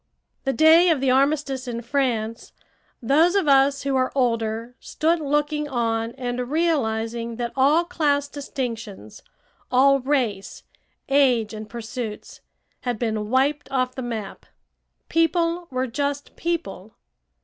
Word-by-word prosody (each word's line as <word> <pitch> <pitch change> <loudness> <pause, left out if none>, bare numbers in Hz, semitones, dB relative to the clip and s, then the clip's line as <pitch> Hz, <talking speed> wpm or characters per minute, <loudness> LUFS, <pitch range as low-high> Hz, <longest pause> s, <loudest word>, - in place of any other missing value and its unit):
The 270 - +1
day 320 +4 +6
of 320 -4 +2
the 265 -1 +2
armistice 275 -1 +1
in 235 -1 -4
France, 235 -4 -2 0.5
those 315 - +3
of 390 -6 +2
us 275 0 +4
who 275 -1 0
are 255 0 +1
older 230 -2 -1
stood 325 +2 0
looking 295 0 -1
on 230 -2 -1
and 245 -1 -4
realizing 235 -8 -1
that 235 0 -4
all 285 +6 +4
class 290 -4 0
distinctions, 230 - -6 0.5
all 275 +2 +5
race, 250 -8 -2 0.4
age, 255 -6 +3
and 215 0 -8
pursuits, 230 0 -7 0.4
had 245 -3 -3
been 215 -2 -2
wiped 275 +4 +1
off 255 -1 0
the 260 - -6
map. 225 -5 -6 0.6
People 335 +1 +1
were 255 0 -1
just 285 +3 -3
people. 220 - -4
260 Hz, 125 wpm, -23 LUFS, 230-290 Hz, 0.6 s, day